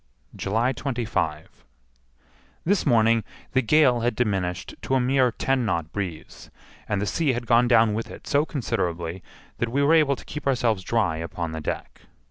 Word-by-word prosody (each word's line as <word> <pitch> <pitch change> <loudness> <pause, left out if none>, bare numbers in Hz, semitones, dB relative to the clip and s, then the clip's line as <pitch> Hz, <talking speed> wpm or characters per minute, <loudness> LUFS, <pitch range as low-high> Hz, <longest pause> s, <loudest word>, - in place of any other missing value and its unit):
July 115 +6 0
25. 115 - -3 1.0
This 190 -1 +1
morning 115 -2 +4 0.3
the 130 - +3
gale 130 -1 +4
had 120 +1 0
diminished 95 -7 -1
to 135 - 0
a - - +3
mere 130 0 +3
ten 135 +2 0
knot 85 -7 -1
breeze, 90 -6 -6 0.4
and 105 - 0
the 100 - -1
sea 145 +5 +1
had 120 0 -4
gone 120 +1 +4
down 115 -3 +4
with 115 +2 -3
it - - -11
so 145 +1 +2
considerably 90 - -3 0.4
that 120 - 0
we 140 +4 +1
were 150 +3 +4
able 150 -4 +4
to - - -13
keep 150 -1 -6
ourselves 120 -6 +1
dry 100 -5 0
upon 85 0 -4
the 80 0 -5
deck. - - -5
115 Hz, 170 wpm, -25 LUFS, 95-130 Hz, 1.0 s, morning